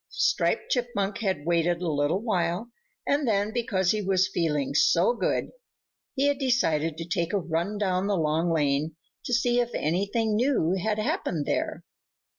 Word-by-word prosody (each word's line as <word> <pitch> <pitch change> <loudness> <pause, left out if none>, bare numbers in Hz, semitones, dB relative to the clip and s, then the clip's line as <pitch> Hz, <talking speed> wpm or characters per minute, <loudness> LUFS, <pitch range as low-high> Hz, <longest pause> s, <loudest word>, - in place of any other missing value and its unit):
Striped - - 0
Chipmunk 235 -5 -1
had 190 -9 -2
waited 170 0 +1
a - - -1
little 150 +5 0
while 185 +1 -1 0.3
and 285 -1 +1
then, 205 0 +1
because 195 -7 +1
he 215 - -1
was 190 -1 +2
feeling 150 -7 -1
so 485 - +4
good, - - -1 0.6
he 275 0 +1
had 285 -1 +1
decided 165 - +1
to 165 - -5
take 170 +1 -2
a - - +3
run 175 +3 -2
down 190 -1 0
the 205 -2 +1
Long 160 +2 +1
Lane 150 0 0 0.3
to - - -4
see 240 0 +2
if 240 -1 0
anything 200 +7 0
new 235 - +2
had 210 +3 -1
happened 170 -7 -1
there. - - -2
190 Hz, 165 wpm, -26 LUFS, 165-225 Hz, 0.6 s, so